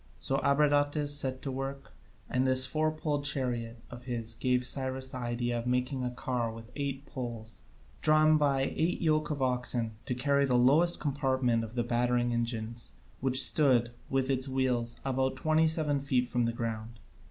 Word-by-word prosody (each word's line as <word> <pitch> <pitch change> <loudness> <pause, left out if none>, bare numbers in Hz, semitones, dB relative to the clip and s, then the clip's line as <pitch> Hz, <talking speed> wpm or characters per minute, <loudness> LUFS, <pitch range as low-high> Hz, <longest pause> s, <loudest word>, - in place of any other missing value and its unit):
So 135 - 0
Abradatas 145 +1 +2
set 130 -3 +1
to 135 - -3
work, 135 +1 -5 0.4
and 130 +1 0
this 130 0 +3
four 155 +2 0
poled 155 -2 -2
chariot 125 -5 -2
of 125 0 -10
his 115 -3 -4
gave 125 +1 0
Cyrus 130 0 -3
the 130 - -5
idea 120 0 -2
of 115 - -5
making 125 +1 -1
a 125 - -1
car 125 -2 -2
with 115 +1 -11
eight 140 -1 -4
poles, 115 -4 -7 0.4
drawn 155 0 +5
by 140 -2 +2
eight 165 +3 0
yoke 155 -2 +1
of 145 -3 -2
oxen, 125 -2 0 0.2
to 125 - -1
carry 140 +2 +2
the 125 - +2
lowest 150 +8 +4
compartment 130 -5 0
of 115 +1 -8
the 120 - 0
battering 120 0 +1
engines, 115 -1 -3 0.3
which 130 0 +4
stood, 125 -6 +4 0.2
with 135 0 0
its 130 0 +1
wheels, 125 -3 -1
about 130 0 0
twenty 155 +4 +2
seven 155 -3 0
feet 130 -3 0
from 120 -1 0
the 115 - 0
ground. 115 0 -5
130 Hz, 175 wpm, -30 LUFS, 120-140 Hz, 0.4 s, drawn